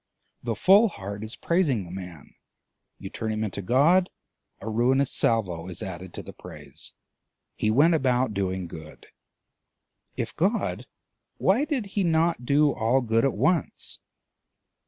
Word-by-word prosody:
The 115 -2 -2
full 200 - +6
heart 100 - -7
is 110 +1 -5
praising 150 - +1
the 85 - -11
man; 90 -4 -9 0.6
you 95 0 -8
turn 110 0 -3
him 110 0 -2
into 100 -1 -4
God, 150 - +3 0.5
a 105 - -9
ruinous 125 +5 +2
salvo 90 -7 0
is 90 -2 -5
added 95 -1 -7
to - - -6
the - - -10
praise. - - -10 0.6
He 110 - 0
went 145 +10 +5
about 130 -6 +1
doing 95 -2 -2
good: 80 -2 -11 1.1
if - - -4
God, - - -1 0.5
why 220 +10 +2
did 280 -8 -2
he 200 - +1
not 165 -6 +1
do 145 +1 +4
all 120 +4 +1
good 115 -1 +1
at 135 - +2
once? 155 - 0
120 Hz, 145 wpm, -26 LUFS, 95-155 Hz, 1.1 s, full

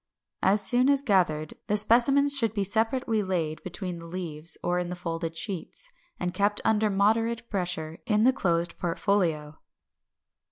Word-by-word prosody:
As 200 +1 +4
soon 250 +2 +4
as 280 -1 +3
gathered, 170 - +1
the 210 - +1
specimens 270 +7 +5
should 225 -5 0
be 200 - 0
separately 225 +2 0
laid 170 -5 -3
between 180 -1 -6
the 165 - -10
leaves 165 -2 -4
or 180 0 0
in 175 -1 -4
the 180 - -4
folded 165 -1 -5
sheets, 200 - -5 0.3
and 180 0 -3
kept 205 +1 0
under 220 -1 +2
moderate 225 +4 0
pressure 175 -4 -3
in 210 -1 +2
the 260 +2 +5
closed 170 -7 0
portfolio. 165 -4 -1
195 Hz, 155 wpm, -26 LUFS, 170-225 Hz, 0.3 s, specimens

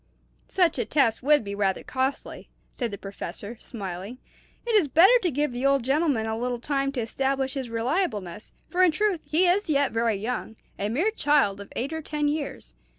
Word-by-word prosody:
"Such 350 -7 +2
a 235 - 0
test 230 -2 +2
would 295 +1 +4
be 200 -1 -5
rather 195 -2 0
costly," 265 +1 -3 0.2
said 240 -3 -3
the 200 - -6
Professor, 200 +3 -8
smiling. 195 0 -7 0.5
"It 475 - -1
is 405 -8 +4
better 335 - +6
to 360 - +1
give 295 -1 -1
the 245 +1 -5
old 275 -2 +3
gentleman 275 -3 +1
a 220 0 -2
little 245 +2 -2
time 275 +2 -1
to 250 - -2
establish 265 +3 -1
his 265 -4 -4
reliableness; 230 - -2 0.2
for 365 - 0
in 365 - +7
truth 375 +1 0
he 335 +4 +4
is 370 +1 +2
yet 285 -2 +2
very 230 -1 +1
young 220 +2 -4 0.2
a 200 +1 -1
mere 325 - +1
child 280 - +2
of 200 - -11
eight 275 +6 -2
or 320 - -3
ten 300 -1 -2
years. 290 - -4
265 Hz, 195 wpm, -26 LUFS, 225-300 Hz, 0.5 s, in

